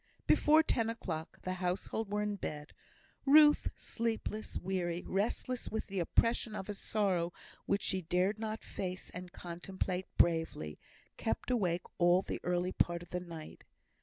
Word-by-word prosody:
Before 310 +1 +6
ten 230 -7 +1
o'clock, 165 -8 -4
the 185 - -1
household 185 +4 -2
were 210 0 +1
in 210 0 -1
bed. 150 -5 -5 0.5
Ruth, 295 +1 +7
sleepless, 225 -2 -2
weary, 180 -2 -2
restless 230 +5 -1
with 220 - -2
the 195 -1 -3
oppression 230 +5 +2
of 190 - -5
a - - -1
sorrow 195 -4 0 0.4
which 200 0 +1
she 190 - +1
dared 180 +5 +1
not 220 0 -3
face 185 -1 -5
and 180 0 -7
contemplate 180 +1 -4
bravely, 160 - +2 0.4
kept - - -1
awake 180 -8 +1 0.2
all 175 +2 +5
the - - -4
early 180 +1 +1
part 175 -1 +1
of - - -16
the 180 - -1
night. 165 -3 -9
185 Hz, 150 wpm, -34 LUFS, 175-215 Hz, 0.5 s, Ruth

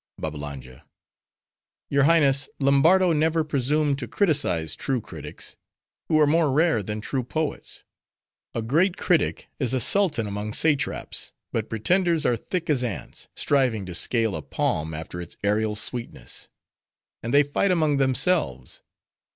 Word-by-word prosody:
BABBALANGA—Your 75 - -6
Highness, 140 -4 +3
Lombardo 160 +7 +4
never 160 +1 +2
presumed 145 0 0
to 120 - -5
criticise 135 - +1
true 135 -2 -1
critics; - - -9 0.5
who 155 - +3
are 150 - +6
more 155 0 +2
rare 150 -5 +2
than 105 +2 -5
true 130 +4 -2
poets. 155 +5 -3 0.7
A 115 - -2
great 170 - +2
critic 180 -3 0
is 130 -2 +1
a - - +1
sultan 155 - +3
among 105 +1 -4
satraps; 145 -4 0 0.2
but 110 -2 -2
pretenders 170 - +1
are 120 - +3
thick 170 - -4
as 140 -5 +1
ants, 115 -5 -4
striving 125 -8 +1
to 90 - -7
scale 115 +3 +1
a 80 - -4
palm, 75 +2 -2
after 80 +2 -6
its 85 - -9
aerial 105 +1 +1
sweetness. 115 +3 -5 0.7
And 115 - -4
they 145 +2 +6
fight 145 +7 0
among 155 -5 +2
themselves. 130 - +1
135 Hz, 135 wpm, -24 LUFS, 105-155 Hz, 0.7 s, are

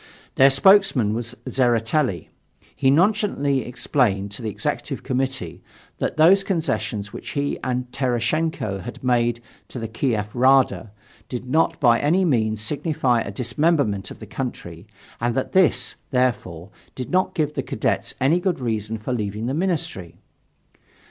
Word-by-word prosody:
Their 135 +1 +6
spokesman 140 - +4
was 120 +1 -5
Tseretelli. 120 - 0 0.5
He 135 - +2
nonchalantly 160 -5 +2
explained 110 -6 0
to 100 - -8
the 110 - -3
Executive 105 - -3
Committee 130 -8 -3 0.4
that - - -2
those 185 +5 +6
concessions 110 - -2
which - - -7
he 140 0 -1
and 125 -1 -1
Tereshchenko 125 -3 -1
had 120 +5 -9
made 120 -2 +1 0.3
to - - -9
the 115 -2 -4
Kiev 110 -2 -2
Rada 130 -4 +3 0.4
did 125 0 -5
not 160 +5 +1
by 120 -4 +4
any 175 +6 +2
means 110 -8 +1
signify 135 0 0
a - - -4
dismemberment 115 - 0
of - - -10
the - - -10
country, 95 -8 -6 0.3
and 120 0 -1
that 130 - -2
this, 145 -10 +3 0.2
therefore, 105 -9 -1 0.2
did 125 - -6
not 185 +1 +1
give 150 -3 0
the - - -2
Cadets - - -2
any 145 +7 +3
good 180 -3 -1
reason 110 -3 -2
for 110 +4 -4
leaving 105 -1 -3
the 130 - -1
Ministry. 155 - -2
125 Hz, 145 wpm, -22 LUFS, 110-145 Hz, 0.5 s, Their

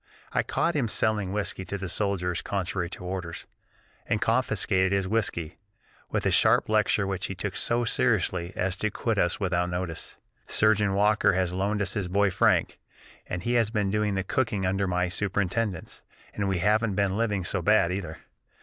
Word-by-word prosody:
I - - +3
caught 170 - -1
him 135 -6 +1
selling 105 -3 0
whiskey 100 -2 -2
to 100 +3 -4
the 95 0 -5
soldiers 90 -3 -1
contrary 95 -2 -3
to 90 - -9
orders, 90 -2 -5 0.6
and 105 - 0
confiscated 105 -5 +1
his 100 -1 0
whiskey, 95 -6 -1 0.5
with - - -2
a - - +3
sharp - - +4
lecture 110 -1 +2
which 95 -1 -2
he 95 - -5
took 95 +2 -4
so 120 +1 +2
seriously 95 -7 +1
as 90 0 0
to 105 - 0
quit 110 0 -2
us 85 +1 +1
without 90 -3 0
notice. 90 -2 -5 0.3
Surgeon 105 -2 +3
Walker 105 0 +3
has 90 -1 0
loaned 100 +3 0
us 95 - -2
his 105 -4 -2
boy 100 +2 +2
Frank, - - +2 0.5
and 90 0 -4
he 120 - 0
has 115 -3 +2
been 105 -3 -1
doing 105 -1 0
the 95 - -1
cooking 105 -2 -1
under 95 +1 0
my 90 0 0
superintendence, 100 +1 -2 0.3
and 100 -1 -2
we 95 - 0
haven't 105 +3 +1
been 100 -1 +1
living 105 -4 0
so 95 +2 -1
bad 95 -2 +3
either. 85 -5 -5
100 Hz, 180 wpm, -27 LUFS, 90-105 Hz, 0.6 s, sharp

